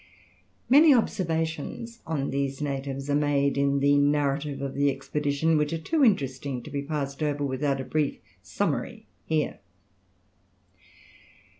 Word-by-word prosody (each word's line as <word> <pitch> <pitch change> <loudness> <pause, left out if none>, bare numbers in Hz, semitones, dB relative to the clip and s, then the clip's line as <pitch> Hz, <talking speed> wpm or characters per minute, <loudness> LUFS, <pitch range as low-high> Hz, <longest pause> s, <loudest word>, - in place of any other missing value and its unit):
Many 290 +3 +7
observations 165 - -2
on 145 -4 -2
these 135 -1 -2
natives 135 -1 -3
are 145 - 0
made 145 -1 +2
in 140 0 +1
the 145 0 +4
narrative 145 0 +1
of 135 -1 -4
the 140 0 +2
expedition, 145 +3 0
which 150 +1 0
are - - 0
too 290 - 0
interesting 135 - +1
to - - -10
be 140 - -2
passed 140 -1 -4
over 145 -1 0
without 135 +1 -1
a - - -3
brief 150 0 -1 0.2
summary 95 -1 -3 0.2
here. 155 -1 -1
145 Hz, 135 wpm, -26 LUFS, 140-155 Hz, 0.2 s, Many